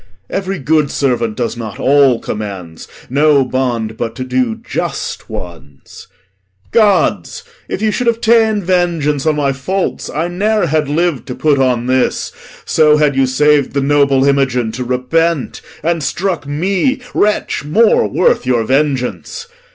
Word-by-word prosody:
Every 195 0 -2
good 150 0 +1
servant 120 -6 -1
does 120 -1 -2
not 110 -3 -7
all 135 -3 +4
commands; 95 -6 -6 0.2
No 140 0 +3
bond 120 -4 -2
but 115 -1 -4
to 130 - -4
do 125 -3 -1
just - - -5
ones. 85 -6 -10 0.6
Gods! 220 - +1 0.3
if 205 - -3
you 215 - +2
Should 245 +3 -2
have 230 -1 +2
ta'en 220 -3 +3
vengeance 170 -5 0
on 155 - +2
my 140 -2 0
faults, 185 +8 -3
I 160 +3 -2
never 205 +3 0
Had 155 -2 0
liv'd 165 -1 -1
to 125 - -5
put 150 -3 +1
on 125 -2 +1
this; 130 0 0 0.3
so 150 -1 +4
had 150 -2 +2
you 135 -1 +2
saved 145 +1 +2
The 140 - +1
noble 140 -1 +3
Imogen 135 -5 +1
to 125 +3 -5
repent, 135 +5 -1 0.2
and 165 0 0
struck 170 +2 -2
Me, 190 - 0
wretch 210 -6 0
more 210 +10 +3
worth 185 - +1
your 125 -2 +1
vengeance. 135 0 -1
145 Hz, 150 wpm, -15 LUFS, 125-170 Hz, 0.6 s, all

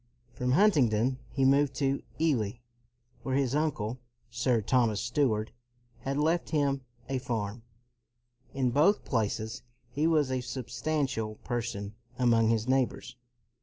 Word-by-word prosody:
'' 120 0 -36
From 125 0 0
Huntingdon, 130 - +3
he 135 +1 +1
moved 140 +1 +3
to 140 -1 0 0.2
Ely 125 -11 +1 0.7
where 130 +2 -2
his 135 -2 +1
uncle, 130 -6 -1 0.3
Sir 120 0 +1
Thomas 110 -1 +2
Steward, 120 -4 0 0.5
had 135 +3 -3
left 160 +4 +1
him 140 -3 +1 0.3
a 135 -1 -1
farm. 115 -3 -3 0.9
In 130 -3 0
both 155 - +3
places 110 0 -1 0.3
he 150 +5 +1
was 150 -5 +2
a 130 -1 0
substantial 130 -2 -2
person 105 -4 -3 0.2
among 115 -3 +4
his 115 0 +1
neighbors. 130 -1 0
130 Hz, 130 wpm, -29 LUFS, 115-140 Hz, 0.9 s, among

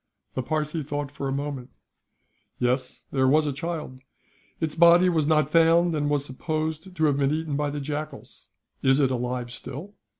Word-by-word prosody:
The 130 - -1
Parsee 155 +3 -2
thought 145 -1 -4
for 140 -1 -4
a - - -2
moment. 140 -2 -4 0.9
"Yes, 125 +1 -1
there 130 -1 +2
was 150 +3 +4
a 145 - -1
child. 150 -3 -5 0.6
Its 160 -2 -1
body 170 +2 +6
was 160 -4 +1
not 155 -2 +2
found, 165 +1 +4
and 145 -1 0
was 145 -1 +1
supposed 155 +5 -3
to 160 - -1
have 145 -2 +2
been 140 0 +2
eaten 155 -1 -2
by 145 0 0
the 145 0 -4
jackals. 150 0 -6 0.3
Is 135 +1 +4
it 135 -2 +3
alive 125 -1 -2
still?" 140 +10 -7
145 Hz, 175 wpm, -25 LUFS, 135-160 Hz, 0.9 s, body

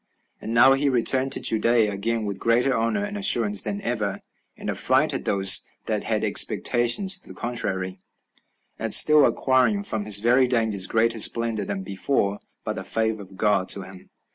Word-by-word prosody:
And 110 - -7
now 120 +3 +4
he 140 +1 0
returned 130 +1 0
to - - -2
Judea 115 -1 +2
again 110 +3 -4
with 100 -2 -6
greater 120 +3 0
honor 115 - -2
and 205 0 -7
assurance 115 - +2
than 200 - -6
ever, 105 - -4 0.4
and - - -10
affrighted - - 0
those 95 -1 +4 0.2
that - - -3
had - - -2
expectations 125 +12 +3
to - - -23
the - - -12
contrary, 95 -6 -4 0.8
as - - +3
still 150 -2 +5
acquiring 135 +11 0
from 110 - -3
his 105 -1 +5
very 125 +4 +1
dangers 110 -6 +1
greater 115 0 -1
splendor 115 -2 +1
than 95 -1 -6
before, 100 +1 -2 0.2
by - - -4
the - - -8
favor 110 -1 -3
of 95 -1 -15
God 100 -3 -1
to 100 - +2
him. 95 -1 -15
115 Hz, 170 wpm, -22 LUFS, 100-130 Hz, 0.8 s, still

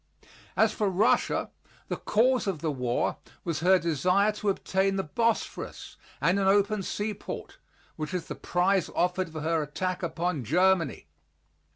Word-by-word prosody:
As 220 -1 +4
for 210 -2 0
Russia, 190 +4 +2 0.4
the - - -2
cause 250 +1 +2
of 190 -4 0
the 160 -2 0
war 125 -3 -1 0.3
was 165 -4 -2
her 185 +4 +5
desire 180 +5 +2
to 210 -1 -2
obtain 195 0 +1
the 195 - 0
Bosphorus 230 +8 -2 0.2
and 180 +4 +2
an 195 - +2
open 205 +1 +3
seaport, 205 +2 -5 0.4
which 155 0 -4
is 180 -2 -3
the - - -5
prize 180 +6 +1
offered 180 -1 0
for 155 -1 -6
her 160 +1 +1
attack 180 +5 -3
upon 170 -4 -2
Germany. 175 - +2
185 Hz, 150 wpm, -28 LUFS, 165-200 Hz, 0.4 s, her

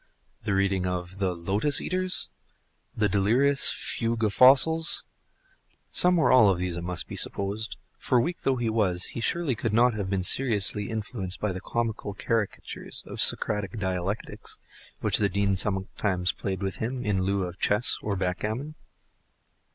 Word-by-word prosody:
the 105 -2 -1
reading 95 -1 0
of 90 +1 -5
the 95 -2 -1
"Lotus 100 - 0
eaters?" 185 0 0 0.7
the 105 - +2
delirious 120 +8 +2
Fugue 115 -1 -2
of 105 -2 +1
Fossils? 155 +7 +5 0.9
Some 180 0 +4
or 160 - +3
all 125 -5 +6
of 95 - +1
these 90 -1 -2
it 85 - -5
must 90 0 -2
be - - -7
supposed; 100 +3 -1 0.2
for 125 - +1
weak 170 +9 -2
though 135 - +1
he 120 -2 -2
was, 100 -6 0
he - - -5
surely 165 +2 0
could 115 -1 -3
not 120 +2 +4
have 100 -3 -4
been 95 -1 -1
seriously 105 -3 +2
influenced 105 -4 -5
by 105 - -1
the 95 0 -6
comical 110 -3 -3
caricatures 110 0 -3
of - - -4
Socratic 105 +1 +4
dialectics, 95 0 -4 0.4
which - - +2
the 100 -2 +1
Dean 100 0 0
sometimes 95 -1 0
played 95 -1 -5
with 95 -2 -3
him 125 +2 -4
in 100 -3 0
lieu 100 +1 0
of 90 0 -7
chess 105 +4 +2
or 105 -2 -2
backgammon. 105 +10 -3
105 Hz, 160 wpm, -26 LUFS, 95-120 Hz, 0.9 s, all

